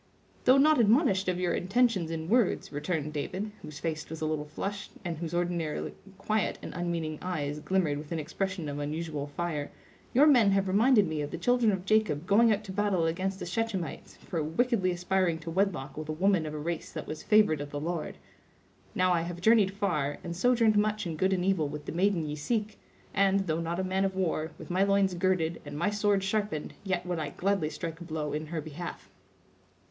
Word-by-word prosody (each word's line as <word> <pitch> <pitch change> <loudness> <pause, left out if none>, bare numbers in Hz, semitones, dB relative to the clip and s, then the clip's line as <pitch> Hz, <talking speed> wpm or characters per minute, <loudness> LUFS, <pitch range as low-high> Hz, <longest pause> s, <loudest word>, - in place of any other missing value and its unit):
"Though 255 +2 +7
not 300 +1 +5
admonished 215 - +3
of 180 -1 0
your 180 -1 +1
intentions 195 -3 +1
in 160 -1 -4
words," 230 0 +2
returned 150 0 -2
David, 185 +8 -3
whose 150 - -9
face 155 -2 -4
was 160 0 -6
a 155 - -2
little 155 -1 -1
flushed, 195 +7 -5
and 170 -1 -2
whose 165 -2 -4
ordinarily 175 -3 -2 0.2
quiet 215 -2 0
and - - -6
unmeaning 170 -3 -2
eyes 150 -5 -3
glimmered 160 -3 0
with 150 +1 -10
an 165 - -1
expression 180 +2 -3
of 145 0 -4
unusual 150 0 -3
fire, 150 -1 -3 0.4
"your 275 +5 +6
men 245 -9 +6
have 195 0 +2
reminded 210 +1 +4
me 155 -1 -2
of 145 - -3
the 170 - -5
children 240 +4 +3
of 190 -2 -3
Jacob 205 -8 +2
going 220 +4 +5
out 210 0 0
to 200 - -7
battle 195 -3 +1
against 190 +4 -1
the - - -6
Shechemites, 190 -1 -3
for 165 - -4
wickedly 190 - +1
aspiring 180 -1 +1
to 165 0 -7
wedlock 165 -7 0
with 155 0 -6
a - - 0
woman 180 -1 +2
of 155 - -5
a - - -3
race 165 +2 -4
that - - -5
was 155 - -6
favored 210 -9 +4
of 145 - -5
the 145 - -4
Lord. 165 +1 -3 0.8
Now, 185 0 +3
I 170 - +2
have 175 +1 -5
journeyed 215 +1 +5
far, 175 -8 -1
and 170 - -5
sojourned 230 +1 +3
much 210 0 +1
in 165 -2 -3
good 190 +5 +1
and 180 -1 +1
evil 190 -6 +2
with 150 +1 -7
the - - -4
maiden 180 -1 +1
ye 150 0 -3
seek; 210 +7 -2 0.3
and, 195 0 +3
though 165 -3 -1
not 170 +2 -2
a - - 0
man 190 +1 0
of 190 -1 0
war, 160 -4 0
with - - -9
my 185 +2 +1
loins 195 -1 +3
girded 175 -2 0
and - - -7
my 175 +6 +1
sword 205 -1 +2
sharpened, 200 -5 -2
yet 190 -3 -1
would 175 -2 -2
I 150 -2 -2
gladly 190 0 0
strike 165 +2 -6
a - - -5
blow 155 -3 -3
in 155 +1 -3
her 160 0 -3
behalf." 160 +3 -7
175 Hz, 215 wpm, -29 LUFS, 155-200 Hz, 0.8 s, Though